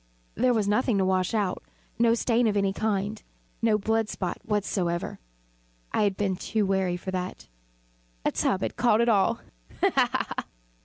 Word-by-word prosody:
There 250 0 +2
was 210 -3 +1
nothing 210 +1 +2
to 190 - +2
wash 185 +2 +1
out 200 -4 0 0.4
no 230 0 +5
stain 235 0 +2
of 210 -1 +1
any 195 -1 +1
kind 210 0 -1 0.4
no 225 -2 +3
blood 220 +1 0
spot 180 -3 -3
whatever. 185 -5 -1 0.7
I - - +1
had 200 -2 +1
been 195 -3 0
too 215 +2 0
wary 190 -2 +1
for 190 +1 -5
that. 185 0 -4 0.8
A - - +3
tub 190 - 0
had - - -3
caught 235 -1 +3
all 205 -4 +3 0.4
ha! - - +3
ha! - - 0
205 Hz, 160 wpm, -27 LUFS, 190-225 Hz, 0.8 s, no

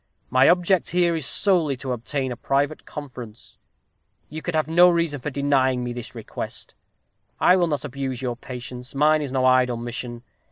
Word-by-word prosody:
My 130 +1 +5
object 180 +1 +2
here 175 -1 +2
is 155 -4 -1
solely 160 -4 +3
to 130 +1 -5
obtain 130 +2 -2
a - - -4
private 140 +5 -1
conference. 125 -6 -10 0.7
You 155 +1 -7
can 175 0 -3
have 155 -1 +1
no 175 +2 +6
reason 170 -4 0
for 140 - -4
denying 130 -3 +1
me 120 0 -4
this 120 -1 -8
request. - - -7 0.7
I 180 - +5
will 175 -2 +2
not 145 -3 -2
abuse 135 -2 -4
your 125 -2 -3
patience. 125 +1 -9
Mine 155 +2 +3
is 140 -3 -4
no 130 -1 +1
idle 130 -1 +3
mission. 120 0 -6
135 Hz, 175 wpm, -23 LUFS, 125-155 Hz, 0.7 s, no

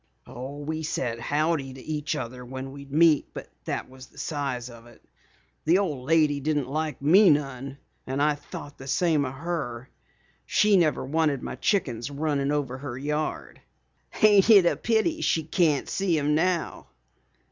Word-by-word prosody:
"Oh, 130 +3 -8
we 155 +2 -4
said 125 -6 -2
howdy 145 +1 -1
to - - -10
each 155 0 -3
other 125 -2 -6
when 130 +2 -7
we'd 140 0 -11
meet, 155 0 +4
but - - -7 0.2
that - - -3
was 130 0 -13
the - - -24
size 140 -5 -3
of 120 -1 -13
it. 120 - -19 0.6
The 165 +4 +5
old 150 -10 -2
lady 155 -3 +3
didn't 145 -2 -1
like 155 +1 -3
me 185 +7 +6
none 135 -2 -1 0.3
and 130 +2 -2
I 150 +1 +3
thought 145 0 -10
the 135 - -9
same 155 0 +2
of 130 - -5
her. 135 -6 -4 0.6
She 210 -1 +4
never 165 -7 +2
wanted 150 -1 0
my - - -4
chickens 125 - -1
runnin' 145 -1 -1
over 135 -3 -2
her 130 -3 -6
yard. 150 +3 -3 0.6
Ain't 205 -1 +6
it 200 -5 +8
a - - +3
pity 235 +9 0
she 160 - +1
can't 155 -3 +1
see 190 -4 0
'em 150 0 +1
now?" 170 +2 0
145 Hz, 170 wpm, -26 LUFS, 135-160 Hz, 0.6 s, it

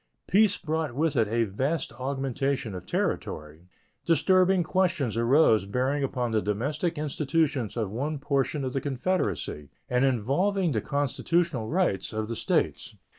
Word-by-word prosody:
Peace 205 0 +3
brought 155 -4 -2
with 155 +1 +1
it 115 -4 +3
a 115 +2 +1
vast 130 +8 -2
augmentation 135 -2 -2
of 90 - -8
territory. 75 +3 -3 0.4
Disturbing 185 +2 +3
questions 170 - 0
arose 115 -3 +4
bearing 130 +6 0
upon 125 -3 -1
the 110 -1 +2
domestic 145 - -2
institutions 145 -5 -1
of 110 -4 -1
one 145 +7 -2
portion 140 0 -1
of 130 - -3
the 135 - -1
Confederacy 125 - -2 0.2
and 125 +1 +1
involving 150 - +1
the 110 -5 0
constitutional 145 - 0
rights 170 - 0
of 110 0 -2
the 115 - -3
States. - - -1
135 Hz, 140 wpm, -27 LUFS, 115-160 Hz, 0.4 s, arose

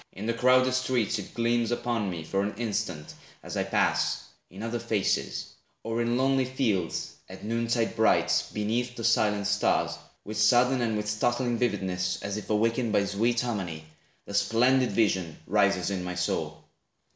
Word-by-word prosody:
In 100 - -7
the 115 - 0
crowded 130 +2 +4
streets 125 -4 0
it 100 - -9
gleams 115 -1 +1
Upon 120 -3 -1
me, 85 -3 -5
for 95 +5 -1
an 100 +1 -2
instant, 105 -8 -3 0.3
as - - -7
I - - +1
pass, - - +1 0.3
In 95 +4 -9
other 115 +1 -2
faces; 110 -4 -1 0.3
or 115 +1 -1
in 120 +1 +1
lonely 135 0 +2
fields, 115 - -1 0.2
At 95 0 -10
noon 115 +1 -1
tide 115 -1 0
bright, 110 -1 +3
beneath 120 +4 -2
the 115 - -6
silent 105 -3 +2
stars, 105 +1 +1 0.3
With 110 +1 -5
sudden 125 +3 +4
and 115 -2 0
with 105 0 -3
startling 120 +2 0
vividness, 90 -6 -1
As 100 0 -3
if 105 - -6
awakened 115 +2 +1
by 100 -1 +3
sweet 115 +4 +1
harmony, 95 -10 -4 0.4
The 100 - -9
splendid 120 +5 +3
vision 95 -6 +1
rises 95 -2 +2
in 95 -2 -2
my 90 0 -4
soul. 90 0 -2
110 Hz, 170 wpm, -27 LUFS, 100-120 Hz, 0.4 s, crowded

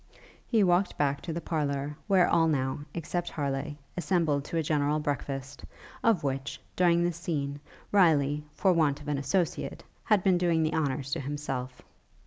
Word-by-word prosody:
He 225 -4 +3
walked 180 +1 +2
back 140 -1 +1
to 170 - -5
the 170 +1 -3
parlour, 145 -3 -2
where 190 -3 +5
all 165 -1 +4
now, 130 -4 0 0.2
except 175 +1 -2
Harleigh, 140 0 -3 0.2
assembled 165 -4 +1
to 165 - -3
a 165 - +1
general 150 0 +1
breakfast, 140 -3 -4 0.4
of 225 -9 +3
which, 135 -1 -3 0.2
during 175 -1 +4
this 175 -1 -1
scene, 145 -4 -3 0.3
Riley, 150 -7 +4
for 190 -2 +3
want 150 -4 +2
of 145 - -11
an 145 -2 0
associate, 170 +5 -1 0.2
had 210 -4 +3
been 185 -2 +4
doing 170 -2 +2
the 155 0 0
honors 140 -3 -1
to - - 0
himself. 135 -2 -4
150 Hz, 165 wpm, -29 LUFS, 140-175 Hz, 0.4 s, where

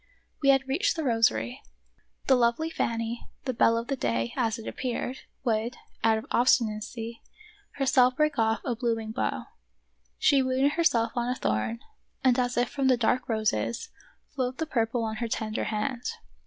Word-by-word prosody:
We 275 - +3
had 270 -1 +4
reached 320 +10 +1
the 320 - -2
rosary. 220 - +1 0.6
The 270 - +5
lovely 245 +7 +1
Fanny, 230 -3 -2 0.2
the 255 - -1
belle 230 0 +4
of 230 - -2
the 275 - -1
day, 115 - -1
as 230 -2 0
it 225 - -9
appeared, 255 0 -3 0.2
would, 230 0 0 0.3
out 220 0 +4
of 220 - -6
obstinacy, 230 -1 +1 0.5
herself 255 -2 +3
break 305 -2 +1
off 225 0 +2
a 240 - 0
blooming 225 -2 -1
bough. 110 - -2 0.7
She 275 -1 +4
wounded 260 +2 +2
herself 235 -9 +2
on 240 0 0
a 250 - 0
thorn, 115 - -1 0.4
and 255 -1 +4
as 245 -1 0
if 245 0 +3
from 275 +1 -1
the 255 -1 +4
dark 245 +2 +1
roses, 225 - -1 0.4
flowed 255 -2 -2
the 320 - -1
purple 230 -4 0
on 220 -1 -3
her 235 - -2
tender 220 0 -2
hand. 235 +3 -2
240 Hz, 170 wpm, -27 LUFS, 225-260 Hz, 0.7 s, The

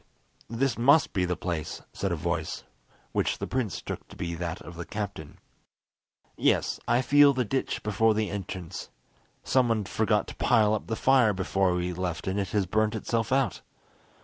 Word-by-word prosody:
"This 115 +2 0
must 140 +6 +5
be 95 -3 +1
the 90 0 -1
place," 80 -4 -4
said - - -2
a - - +1
voice, - - -3 0.5
which - - 0
the - - -4
prince 120 -9 -2
took - - -6
to - - -13
be 85 -1 -4
that 85 0 -4
of 85 - -10
the 85 - -5
captain. 100 -7 -6 1.0
"Yes, - - +1
I 120 +2 +3
feel 145 +2 +6
the 130 -2 0
ditch 135 +5 -2
before 105 +1 +2
the 105 -2 -1
entrance. 95 -3 -6 0.5
Someone 115 -5 +2
forgot - - +1
to - - -9
pile 110 -1 +3
up 110 - -2
the 110 - -1
fire 125 -4 +4
before 95 -1 +1
we 90 0 -1
left 90 -3 -3
and 95 +1 -1
it 100 - -1
has 100 -1 +1
burnt 110 +4 +1
itself 115 +1 -1
out! 130 -7 +1
105 Hz, 175 wpm, -27 LUFS, 90-115 Hz, 1.0 s, feel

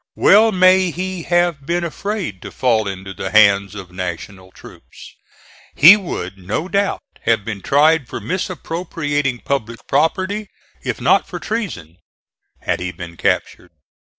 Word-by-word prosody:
Well 220 +2 +5
may 185 -1 +4
he 185 +2 -4
have 175 -4 +1
been 175 +1 0
afraid 170 - -4
to - - -8
fall 115 -4 +1
into 95 0 -6
the 95 - -5
hands 100 -1 +4
of 95 -3 -9
National 95 +1 -7
troops. - - -15 0.6
He 170 +7 +9
would 180 - -6
no 95 - -3
doubt 200 +1 -1 0.2
have 115 -3 +1
been 105 -4 -5
tried 150 - +3
for - - -6
misappropriating 165 -7 -3
public 115 -4 -3
property, 190 +6 0 0.3
if - - -4
not - - +3
for - - -6
treason, 150 - -5 0.6
had - - -1
he 90 0 -4
been 85 -1 -9
captured. - - -1
145 Hz, 140 wpm, -19 LUFS, -, 0.6 s, He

